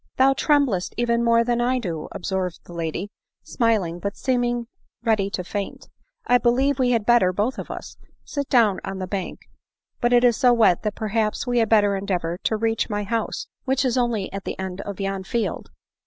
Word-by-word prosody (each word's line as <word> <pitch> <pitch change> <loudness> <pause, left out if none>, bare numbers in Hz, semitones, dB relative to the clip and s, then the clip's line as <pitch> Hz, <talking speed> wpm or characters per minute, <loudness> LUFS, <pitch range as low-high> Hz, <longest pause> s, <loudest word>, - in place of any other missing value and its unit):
" - - -51
Thou 270 +1 +5
tremblest 270 - +1
even 235 0 +1
more 230 0 +4
than 240 0 0
I 250 +2 +2
do," 170 -10 -4
observed 185 -1 -3
the 175 - -11
lady, 170 +4 -4 0.3
smiling, 210 -8 0
but 200 +2 -4
seeming 245 -2 0 0.4
ready 215 -4 +2
to 185 - -3
faint; 200 +2 -5 0.2
" - - -46
I 245 0 +4
believe 265 +3 +2
we 255 -1 +3
had 230 -4 +1
better, 235 -6 +4
both 210 +8 -1
of - - -7
us, - - -8 0.3
sit 285 -2 -4
down 220 -7 +4
on 195 - -5
the 190 - -3
bank; 190 -1 -4 0.6
but 240 - +1
it 245 0 +5
is 240 -2 +5
so 250 -3 +5
wet 220 -7 +4
that 210 -2 -2
perhaps 215 0 -1
we 245 -1 +1
had 225 -2 +2
better 205 -2 +4
endeavor 180 -3 -2
to 220 - +1
reach 225 +1 0
my 205 -1 -1
house, 225 +3 -2 0.2
which 265 0 +1
is 250 - +1
only 235 -7 0
at 195 -1 -5
the - - -5
end 190 0 -5
of 200 -1 -7
yon 195 -1 -2
field." 235 +3 -3
225 Hz, 205 wpm, -23 LUFS, 195-240 Hz, 0.6 s, Thou